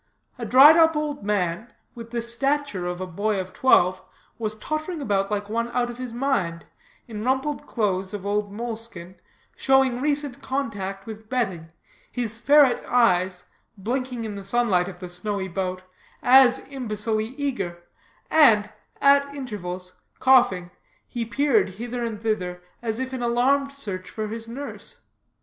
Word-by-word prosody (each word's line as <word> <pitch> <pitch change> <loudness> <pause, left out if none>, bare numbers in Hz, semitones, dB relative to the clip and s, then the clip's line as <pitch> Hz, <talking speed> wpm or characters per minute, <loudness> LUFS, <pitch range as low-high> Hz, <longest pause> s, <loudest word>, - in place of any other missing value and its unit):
A 235 - -4
dried 280 +7 +8
up 320 -1 +5
old 300 -6 -2
man, 200 +1 -1 0.2
with 230 -1 -9
the 235 0 -3
stature 255 -5 -1
of 180 +1 -4
a - - -2
boy 200 +3 -1
of 185 0 -6
twelve, 185 -7 +4 0.4
was 215 -1 -3
tottering 310 - -4
about 200 -7 0
like 205 -1 -2
one 230 +2 -1
out 245 -1 0
of 240 - -11
his 255 -2 -5
mind, 200 - -1 0.4
in 215 -2 -6
rumpled 265 +4 -1
clothes 190 -4 -1
of 205 -2 -6
old 205 0 -1
moleskin, 220 -5 -6 0.4
showing 265 -2 +3
recent 290 -2 -1
contact 200 -8 -3
with 220 -1 -9
bedding, 190 -11 -2 0.4
his 230 -2 -3
ferret 285 -1 +5
eyes, 185 -7 +2 0.3
blinking 245 +3 -3
in 215 -2 -4
the 200 -1 -7
sunlight 195 -4 +2
of 180 -2 -9
the 180 - -5
snowy 190 +2 -4
boat, 185 0 -3 0.4
as 255 0 +7
imbecilely 220 -2 -2
eager, 195 -12 -3 0.5
and, 220 -10 +5 0.3
at 280 0 +5
intervals, 185 -8 -6 0.2
coughing, 220 -9 +4 0.4
he 235 -1 -4
peered 265 -2 +2
hither 240 +3 -4
and 225 -2 -4
thither 180 -5 -2 0.2
as 225 -1 -3
if 260 0 -4
in 260 - -4
alarmed 260 +4 +2
search 200 -9 -6
for 215 -1 -4
his 225 +1 -6
nurse. 275 +5 -8
225 Hz, 150 wpm, -24 LUFS, 195-260 Hz, 0.5 s, dried